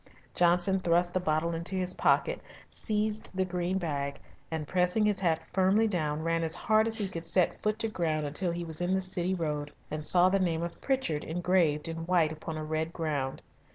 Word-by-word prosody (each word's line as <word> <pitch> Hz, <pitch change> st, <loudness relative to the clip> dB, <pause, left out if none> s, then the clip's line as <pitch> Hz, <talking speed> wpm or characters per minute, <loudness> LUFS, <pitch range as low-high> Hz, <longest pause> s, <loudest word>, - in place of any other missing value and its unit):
Johnson 180 Hz, +2 st, +3 dB
thrust 175 Hz, 0 st, +2 dB
the 185 Hz, -, +2 dB
bottle 165 Hz, -1 st, 0 dB
into 170 Hz, +3 st, -3 dB
his 185 Hz, -1 st, 0 dB
pocket, -, -, +2 dB, 0.3 s
seized 215 Hz, 0 st, -1 dB
the 190 Hz, 0 st, +1 dB
green 180 Hz, +1 st, -1 dB
bag, 140 Hz, -5 st, -3 dB, 0.3 s
and 160 Hz, -2 st, -4 dB
pressing 180 Hz, +5 st, +2 dB
his 210 Hz, -2 st, +2 dB
hat 165 Hz, -4 st, +2 dB
firmly 195 Hz, +4 st, +3 dB
down 155 Hz, -6 st, -1 dB
ran 165 Hz, 0 st, +1 dB
as 160 Hz, 0 st, -1 dB
hard 220 Hz, 0 st, +2 dB
as 225 Hz, 0 st, -1 dB
he 205 Hz, -3 st, -1 dB
could 170 Hz, -3 st, -6 dB
set 170 Hz, +1 st, +1 dB
foot 215 Hz, 0 st, 0 dB
to 225 Hz, -, -1 dB
ground 160 Hz, -7 st, -1 dB
until 170 Hz, +5 st, -1 dB
he 170 Hz, 0 st, -3 dB
was 160 Hz, 0 st, -5 dB
in 180 Hz, +2 st, +1 dB
the 190 Hz, -, +1 dB
City 185 Hz, 0 st, -1 dB
Road 150 Hz, -4 st, -3 dB, 0.2 s
and 155 Hz, 0 st, -3 dB
saw 180 Hz, +3 st, +5 dB
the 195 Hz, +1 st, +2 dB
name 170 Hz, -3 st, 0 dB
of 170 Hz, -, -6 dB
Pritchard 255 Hz, -, 0 dB
engraved 170 Hz, -3 st, +1 dB
in 165 Hz, 0 st, -4 dB
white 170 Hz, -4 st, +3 dB
upon 155 Hz, 0 st, -6 dB
a 155 Hz, -, -4 dB
red 155 Hz, +1 st, -2 dB
ground. 145 Hz, -6 st, -3 dB
175 Hz, 205 wpm, -29 LUFS, 160-185 Hz, 0.3 s, saw